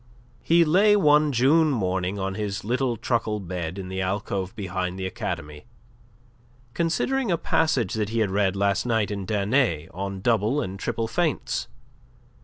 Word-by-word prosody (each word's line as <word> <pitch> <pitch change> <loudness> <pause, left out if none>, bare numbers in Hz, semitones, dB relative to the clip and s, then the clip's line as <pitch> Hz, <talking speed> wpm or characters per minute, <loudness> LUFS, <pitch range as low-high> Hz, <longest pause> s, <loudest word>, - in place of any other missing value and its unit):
He 170 +7 +4
lay 200 +7 +5
one 150 -5 +4
June 145 +6 +4
morning 95 -6 -1
on 95 0 -2
his 100 -1 -4
little 125 +2 0
truckle 110 -2 -1
bed 90 -2 -5
in 95 -1 -6
the 95 0 -3
alcove 95 0 -2
behind 95 -2 -3
the 95 - -4
academy, 75 -3 -5 1.1
considering 215 - 0
a 170 - +2
passage 145 - +1
that 105 -2 -1
he 115 - -3
had 110 -4 +1
read 100 -1 +1
last 100 0 +1
night 110 -4 0
in 100 -2 -4
Danet 105 - +1
on 95 +1 -5
double 115 +4 +2
and 95 -7 -4
triple 115 +2 -2
feints. 125 - -1
105 Hz, 155 wpm, -25 LUFS, 95-135 Hz, 1.1 s, lay